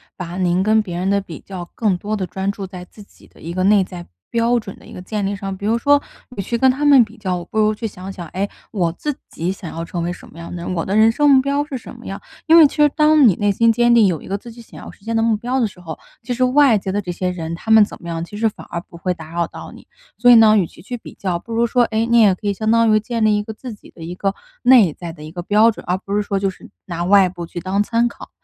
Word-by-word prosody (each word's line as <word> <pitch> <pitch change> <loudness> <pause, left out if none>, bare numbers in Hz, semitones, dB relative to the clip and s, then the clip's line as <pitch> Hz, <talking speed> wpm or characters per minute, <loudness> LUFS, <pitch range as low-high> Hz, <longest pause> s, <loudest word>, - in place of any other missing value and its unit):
把 180 -1 -7
您 180 -1 +1
跟 220 +2 +3
别 180 -5 -6
人 185 +2 -1
的 200 0 +2
比 170 -5 -10
较， 180 -3 -9
更 205 -5 +1
多 210 +4 -3
的 195 -3 -2
专 190 +2 -3
注 200 -1 -7
在 180 -1 -9
自 205 +3 -15
己 - - -22
的 - - -22
一 165 +2 -6
个 185 +1 -1
内 200 0 +4
在 180 -2 -9 0.2
标 235 +1 +1
准 200 -4 -9
的 - - -18
一 - - -14
个 - - -8
建 205 +2 -3
立 200 +1 -2
上。 195 -1 -5
比 200 - -8
如 225 +2 +2
说， 285 +4 +3 0.3
你 195 - -3
去 235 - -2
跟 260 +2 +4
他 265 +3 -1
们 280 -4 +7
比 220 +2 -17
较， 180 -4 -3
不 220 - -3
如 215 0 +3
去 225 +1 -4
想 190 -1 -9
想： 175 -3 -8
“诶？ 200 +2 -2 0.2
我 175 -6 0
自 295 - -4
己 170 +3 -3
想 185 -3 -8
要 165 +1 -5
成 170 0 -4
为 175 - -2
什 180 - -10
么 - - -16
样 170 +1 -8
的 - - -5
人？ 180 - -3
我 165 -2 -2
的 195 - -2
人 220 +1 +6
生 290 +5 +2
目 270 -2 +6
标 280 +2 0
是 290 -3 -6
什 240 - -11
么 - - -14
样？ - - -6 0.3
“因 325 +1 +7
为 320 -3 +9
其 - - -11
实 295 -1 +4
当 305 -1 +4
你 195 - +4
内 205 +2 +1
心 230 +3 +3
坚 240 +1 +3
定， 225 -3 +6
有 170 -6 0
一 - - -12
个 200 - -2
自 235 +3 -12
己 235 +1 -13
想 230 - -14
要 - - -9
实 200 - -22
现 230 - -2
的 225 - +2
目 225 -1 +2
标 245 +4 -2
的 230 - +2
时 190 - -15
候， 165 -3 -8 0.3
其 245 - -3
实 255 +1 0
外 255 -2 +4
界 190 -1 -4
的 205 +2 -1
这 180 -3 -5
些 180 +1 -2
人 165 -2 -5
他 220 - -5
们 220 -1 +7
怎 - - -11
么 170 - -8
样， 165 0 -3
其 205 - -12
实 220 +1 +1
反 - - -13
而 170 0 -4
不 170 - -15
会 180 +1 -1
打 160 -2 -12
扰 170 0 -1
到 - - -10
你。 - - -15 0.3
所 245 +2 +4
以 245 - +9
呢， 220 -1 +7
与 185 -5 +1
其 170 - -17
去 245 +6 -6
比 - - -12
较， 180 -3 -3
不 230 - -9
如 230 +1 +2
说， 245 +1 +2
哎， 225 0 0
你 235 0 +3
也 205 -4 +5
可 205 - -7
以 200 - +1
相 215 +2 -2
当 230 -1 +4
于， 215 - +4
建 230 +1 -3
立 215 -1 +3
一 210 - -2
个 220 - -7
自 240 +2 -8
己 205 - -16
的 170 - -16
一 170 +2 -6
个， 195 +2 -2 0.3
内 230 - +6
在 170 -2 -8
的 150 - -12
一 155 - -9
个 175 +1 -6
标 210 +5 +4
准， - - -11
而 180 +1 +1
不 200 +1 -5
是 210 - +2
说 200 -1 -2
就 195 0 0
是 190 - -12 0.2
拿 175 -1 -4
外 195 -1 +5
部 175 -1 -7
去 175 - -7
当 190 +3 0
参 230 +3 +1
考。 - - -12
205 Hz, 345 characters per minute, -19 LUFS, 180-230 Hz, 0.3 s, 为